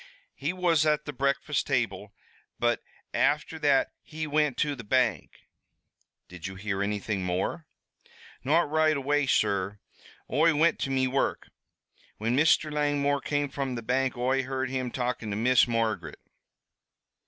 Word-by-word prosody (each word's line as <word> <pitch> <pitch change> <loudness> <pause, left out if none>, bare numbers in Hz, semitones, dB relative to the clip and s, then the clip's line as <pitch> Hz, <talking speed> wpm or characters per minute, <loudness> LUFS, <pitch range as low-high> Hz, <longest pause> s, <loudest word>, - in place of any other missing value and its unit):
"He 145 +4 -2
was 175 -4 +2
at 150 -1 +1
the 145 - -5
breakfast 140 +2 0
table, 105 -7 -1 0.5
but - - +1 0.3
afther 150 +2 +1
that 145 -3 +3
he 155 0 -6
wint 150 -3 +1
to 145 +1 0
the 120 - -9
bank." 125 +4 0 0.8
"Did 90 -2 -8
you 95 - -8
hear 95 0 -3
anything 100 -1 -2
more?" 90 - -2 0.8
"Not 155 +6 +3
right 155 0 +2
away, 145 +1 +1
sur. 100 -4 +1 0.6
Oi 160 +1 +4
wint 165 +3 +3
to - - -2
me 130 -1 +1
work. 135 +1 -1 0.7
Whin 115 +3 0
Mr. 155 +1 +3
Langmore 145 -1 +1
came 145 0 -1
from 135 -2 -3
the 115 - -5
bank 130 +2 0
Oi 130 +2 +1
heard 130 0 -3
him 130 -2 -2
talkin' 120 -3 -3
to 100 - -2
Miss 125 +3 +4
Margaret." 110 -9 -2
135 Hz, 145 wpm, -28 LUFS, 115-150 Hz, 0.8 s, Oi